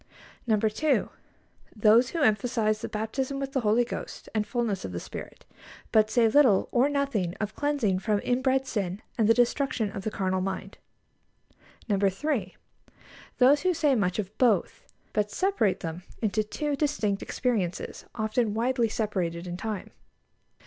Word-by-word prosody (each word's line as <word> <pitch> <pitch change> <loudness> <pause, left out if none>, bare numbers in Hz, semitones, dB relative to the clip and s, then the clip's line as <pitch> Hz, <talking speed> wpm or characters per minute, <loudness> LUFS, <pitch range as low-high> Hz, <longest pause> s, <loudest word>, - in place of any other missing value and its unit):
2. 220 +7 +2 0.7
Those 225 +3 +5
who 330 0 -1
emphasise 215 -1 +1
the - - -4
baptism 260 +6 -3
with 275 -1 -3
the 270 - +2
Holy 230 +1 +3
Ghost 245 - -7
and 215 -1 0
fullness 235 -6 -1
of 95 - -5
the 85 - -3
Spirit, - - -9 0.5
but 215 -1 +4
say 235 -1 +4
little 230 -5 +4
or 255 +3 +3
nothing 275 -12 -1
of 215 0 -3
cleansing 270 -9 0
from 210 +1 0
inbred 260 +1 +1
sin 200 -5 -3 0.2
and 220 -1 +3
the - - +8
destruction 245 -2 +1
of 195 - -5
the 215 - -1
carnal 185 -3 -1
mind. 190 0 -5 1.1
3. 200 +1 0 0.8
Those 275 +3 +5
who 365 -1 +1
say 295 -2 +3
much 200 -7 +1
of 210 0 -4
both, 225 -8 +2 0.3
but 210 -1 +1
separate 370 - +1
them 165 +1 -5 0.2
into 215 -1 0
two 290 +7 -2
distinct 275 -9 0
experiences, 205 -9 -2
often 215 0 0
widely 235 0 +1
separated 185 -6 -2
in 175 -1 -5
time. 210 +1 -5
220 Hz, 150 wpm, -27 LUFS, 200-260 Hz, 1.1 s, the